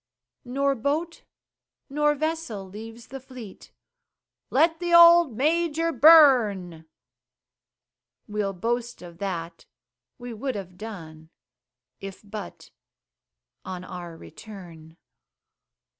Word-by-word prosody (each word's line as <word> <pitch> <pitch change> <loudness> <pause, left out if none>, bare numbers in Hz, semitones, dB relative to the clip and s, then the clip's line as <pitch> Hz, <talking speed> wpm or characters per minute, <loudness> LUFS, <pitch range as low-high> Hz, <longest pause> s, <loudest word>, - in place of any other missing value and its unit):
Nor 275 +3 0
boat 295 +7 -3 0.6
nor 295 +1 +1
vessel 310 -10 -4
leaves 225 +4 -11
the 270 - -7
fleet 255 -6 -12 0.8
"Let 325 0 +2
the 345 -1 +1
old 340 -7 +7
Major 330 +3 +1
burn" 235 - +5 1.4
We'll 205 -2 -2
boast 235 +4 -3
of 170 -1 -12
that 170 -4 -5 0.5
we 245 -1 -8
would 260 +3 -4
have 185 -3 -7
done, 160 -7 -10 0.7
If 195 +1 -9
but 210 0 -9 0.9
on 185 -1 -7
our 175 -2 -9
return. 165 -4 -13
225 Hz, 95 wpm, -25 LUFS, 185-295 Hz, 1.4 s, old